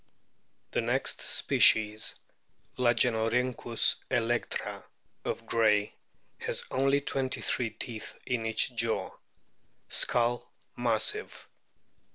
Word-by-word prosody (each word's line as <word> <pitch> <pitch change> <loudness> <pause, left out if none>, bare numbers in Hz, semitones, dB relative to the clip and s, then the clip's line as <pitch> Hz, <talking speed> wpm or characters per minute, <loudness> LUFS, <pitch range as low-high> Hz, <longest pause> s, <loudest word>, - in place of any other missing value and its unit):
The - - 0
next - - 0
species, 110 0 +3 0.6
Lagenorhynchus 120 0 +2
electra 120 0 -2 0.4
of - - -4
Gray,f 105 -2 +2 0.5
has - - 0
only 135 +2 +2
twenty 135 -2 -1
three 120 -2 0
teeth 110 +1 -7
in 120 -3 -2
each 110 +3 0
jaw. 115 -1 -1 0.8
Skull 120 0 +1 0.2
massive. 115 -3 -1
115 Hz, 85 wpm, -29 LUFS, 110-125 Hz, 0.8 s, species